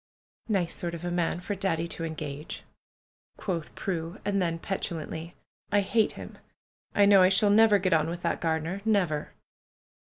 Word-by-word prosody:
"Nice 190 -5 +1
sort 170 -1 -3
of 170 +1 -7
a 175 - -2
man 175 -1 0
for 205 - -3
Daddy 175 -4 -1
to 165 - -4
engage," 155 -2 -5 0.7
quoth 170 -5 -4
Prue; 170 0 -3
and 200 -1 +1
then 165 -2 0
petulantly. 165 -2 -4 0.4
"I 205 0 +4
hate 215 +2 +2
him! - - -10 0.6
I 205 - +6
know 200 -1 +7
I 185 - +6
shall 200 +2 +4
never 215 0 +6
get 185 -2 +1
on 160 0 +3
with 170 +1 -5
that 170 - -1
gardener. 165 +4 -1
Never 180 -9 +1
175 Hz, 165 wpm, -28 LUFS, 165-200 Hz, 0.7 s, know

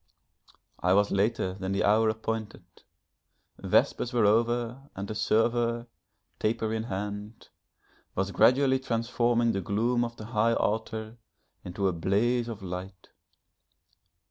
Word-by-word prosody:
I 90 +1 +2
was 100 0 +3
later 100 -1 +1
than 95 0 -4
the 100 - +1
hour 110 +2 +4
appointed; 110 -1 -4 0.9
vespers 125 - +1
were 115 -3 +3
over 120 +5 +1
and 100 +2 -5
a - - -2
server, 115 +2 +1 0.5
taper 110 0 0
in 110 0 -2
hand, 105 +1 -6 0.7
was 95 +1 -1
gradually 130 +4 +4
transforming 120 -1 +1
the 95 - -2
gloom 115 +6 +1
of 120 0 -4
the 110 - -8
high 115 0 +1
altar 110 +1 -2 0.5
into 95 +2 -2
a 95 - +1
blaze 115 +8 +1
of 110 -4 -7
light. 90 0 -7
110 Hz, 125 wpm, -28 LUFS, 100-120 Hz, 0.9 s, hour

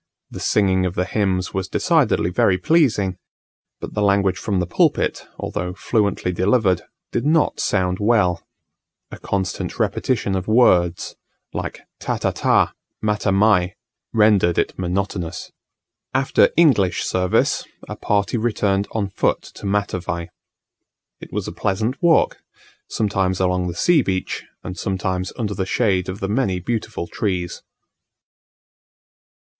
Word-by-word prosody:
The - - -7
singing 95 -3 +2
of 90 - -5
the 90 - 0
hymns 95 -2 -1
was 95 0 -2
decidedly 85 - +2
very 90 +1 +3
pleasing, 105 - +2 0.6
but - - -7
the 105 - -1
language 100 -2 +2
from 100 -3 -1
the 90 - 0
pulpit, 85 - +1
although 90 +1 -4
fluently 100 -2 0
delivered, 95 0 +2 0.3
did 120 - -1
not 155 +2 +2
sound 90 -2 0
well: 105 -5 +2 0.7
a - - -9
constant 95 -2 -3
repetition 115 -6 0
of 95 -1 -3
words, 90 -7 +3 0.4
like - - -5 0.2
"tata - - -1
ta, - - +2 0.3
mata 105 -1 0
mai," 95 -2 +3 0.4
rendered 105 -6 +3
it - - +1
monotonous. 90 -1 -3 0.6
After 135 +1 +4
English 130 - +4
service, 90 -1 +1 0.2
a - - -6
party 100 +3 0
returned 105 -3 0
on 105 -3 -1
foot - - 0
to - - -7
Matavai. 90 -4 -2 0.9
It - - -11
was - - -3
a - - -4
pleasant 110 +7 -2
walk, 170 -2 +3 0.5
sometimes 95 -4 0
along 90 -1 +1
the 85 - -4
sea 165 - +4
beach 95 -5 -3 0.2
and 90 - -6
sometimes 95 -1 -2
under 105 -4 -2
the 95 -1 -3
shade 95 -3 +1
of 95 +2 -6
the 95 - -1
many 100 -4 0
beautiful 110 -1 -3
trees. 90 -3 -3
95 Hz, 130 wpm, -21 LUFS, 90-105 Hz, 0.9 s, After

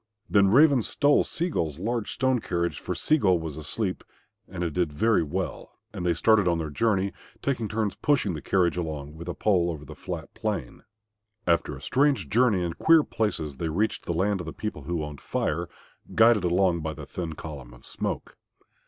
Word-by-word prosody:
Then 100 -2 +4
Raven 140 +4 +6
stole 145 +6 +3
Sea 170 +4 -2
gull's 80 - -1
large 115 +4 -2
strong 130 -1 +1
carriage, 85 -4 -2
for - - -4
Sea 155 0 +2
gull 95 -7 +4
was 80 -3 -5
asleep, 90 +6 -3 0.4
and 90 -1 -5
it 85 -3 -2
did 85 -2 0
very 110 +9 +2
well, 85 +4 -4 0.2
and - - -5
they 85 -1 +2
started 105 +2 +4
on 85 -1 +2
their 80 -2 -4
journey, 100 +2 +1 0.3
taking 125 -5 0
turns 105 -1 -1
pushing 135 -10 +1
the 75 - -5
carriage 90 -2 +1
along 75 -4 -4
with 85 +2 -9
a - - -3
pole 90 -5 +2
over 75 -3 -5
the - - -9
flat - - -7
plain. - - -4 0.6
After 85 -4 +1
a 65 - -11
strange 135 - +2
journey 110 -5 +3
in 85 -1 -2
queer 160 - +5
places 80 - -2
they 80 - -2
reached 105 +8 -1
the - - 0
land 95 +4 +1
of 85 - -6
the 80 - -5
people 90 -10 -5
who 85 -1 -2
owned 75 -2 -7
Fire, 85 +2 -2 0.5
guided 115 -3 +6
along 90 0 +2
by 80 0 -4
the - - -8
thin 85 -3 -5
column 70 -6 -8
of - - -15
smoke. - - -4
90 Hz, 195 wpm, -26 LUFS, 80-110 Hz, 0.6 s, Raven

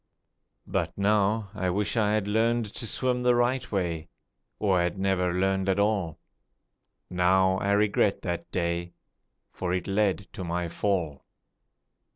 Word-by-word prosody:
But - - -2
now 105 0 +1
I 95 -4 -1
wish 100 +5 -1
I 105 -2 +2
had 105 -2 0
learned 115 +2 +2
to 115 - -4
swim 125 +3 0
the 125 0 +3
right 125 +1 0
way, 85 -5 -2 0.5
Or 95 -4 +2
had 85 +2 -1
never 95 -2 +1
learned 95 +1 0
at 95 - +2
all. 100 -6 0 0.9
Now 95 +1 +2
I 100 0 +1
regret 105 -1 +2
that 85 -1 -3
day, 85 -1 -2 0.6
For 90 -1 -2
it 90 - -3
led 100 -1 0
to 95 - -6
my 85 0 -2
fall. 85 -6 -1
95 Hz, 145 wpm, -27 LUFS, 90-105 Hz, 0.9 s, the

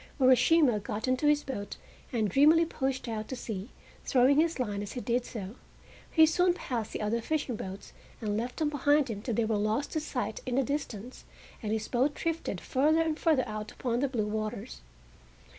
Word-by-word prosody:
Urashima 260 -1 +5
got 210 +4 -4
into 255 +4 +1
his 295 0 +3
boat 205 -7 -5 0.3
and 225 -4 +1
dreamily 305 - +5
pushed 265 -5 -2
out 215 -2 -3
to 260 - -4
sea, 220 -3 -5 0.3
throwing 265 +3 +4
his 330 +1 +2
line 205 -5 -2
as 205 - -6
he 250 - -4
did 245 +1 0
so. 200 -3 -6 0.6
He 320 -1 +6
soon 355 +3 +3
passed 235 -10 -4
the - - -4
other 230 +3 0
fishing 290 -2 -1
boats 195 -1 -8 0.3
and 210 -3 -2
left 240 +3 -3
them 310 -2 +1
behind 290 -1 +2
him 205 -2 -5
till 235 0 -2
they 230 - +2
were 220 -1 0
lost 215 +7 0
to 315 - 0
sight 250 -8 -3
in 250 - -2
the 270 - +3
distance, 255 -4 -4 0.4
and 215 -3 -3
his 220 0 -1
boat 265 +4 +1
drifted 330 - -2
further 305 - +2
and 320 -1 -2
further 305 -7 +2
out 215 0 -5
upon 240 -2 -1
the 280 - +1
blue 240 -5 -1
waters. 215 - -4
250 Hz, 195 wpm, -30 LUFS, 215-290 Hz, 0.6 s, He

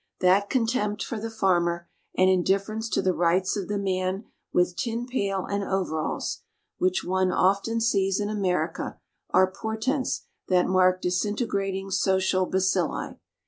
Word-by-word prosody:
That 190 +3 +3
contempt 225 -4 0
for 230 - -4
the 225 +2 -4
farmer, 175 -5 +1 0.3
and 185 - +5
indifference 195 +4 +1
to - - 0
the 185 - +2
rights 175 +3 +2
of 200 -3 -3
the 205 - -1
man 190 +1 -1 0.3
with 180 0 +2
tin 235 +2 -2
pail 200 -7 -1
and 200 0 -2
overalls, 180 -6 -2 0.4
which 185 0 +1
one 185 0 +1
often 200 +5 +2
sees 195 -4 +1
in 205 - -1
America, 180 -5 -1 0.3
are 185 0 +4
portents 220 +7 -2 0.2
that 180 -1 +3
mark 185 0 +3
disintegrating 195 0 -1
social 190 -1 +2
bacilli. 190 -3 0
190 Hz, 140 wpm, -26 LUFS, 185-210 Hz, 0.4 s, and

